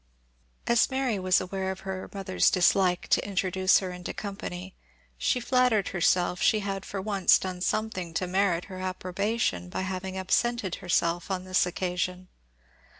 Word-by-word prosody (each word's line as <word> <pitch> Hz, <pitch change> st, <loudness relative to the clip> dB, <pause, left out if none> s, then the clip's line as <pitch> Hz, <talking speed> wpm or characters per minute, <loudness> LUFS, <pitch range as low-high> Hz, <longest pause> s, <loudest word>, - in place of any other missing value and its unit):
As 235 Hz, -1 st, +3 dB
Mary 260 Hz, -6 st, 0 dB
was 185 Hz, 0 st, +3 dB
aware 190 Hz, +1 st, -3 dB
of 190 Hz, 0 st, -5 dB
her 190 Hz, -1 st, -5 dB
mother's 190 Hz, -, +1 dB
dislike 180 Hz, 0 st, +2 dB
to -, -, +3 dB
introduce 190 Hz, -1 st, +2 dB
her 185 Hz, -2 st, -3 dB
into 180 Hz, 0 st, -6 dB
company, 190 Hz, -2 st, -6 dB, 0.4 s
she 250 Hz, -, 0 dB
flattered 245 Hz, -4 st, +2 dB
herself 180 Hz, 0 st, +1 dB
she 215 Hz, -, +3 dB
had 195 Hz, -1 st, -4 dB
for 200 Hz, -, -4 dB
once 195 Hz, -1 st, +4 dB
done 185 Hz, -1 st, -5 dB
something 185 Hz, -4 st, -1 dB
to 185 Hz, -, 0 dB
merit 180 Hz, -1 st, +1 dB
her 185 Hz, -1 st, -8 dB
approbation 185 Hz, -, -2 dB
by -, -, -3 dB
having 190 Hz, 0 st, -4 dB
absented 195 Hz, +1 st, 0 dB
herself 175 Hz, 0 st, 0 dB
on 185 Hz, -1 st, -2 dB
this 185 Hz, -1 st, +2 dB
occasion. 180 Hz, 0 st, -3 dB
185 Hz, 150 wpm, -27 LUFS, 180-200 Hz, 0.4 s, once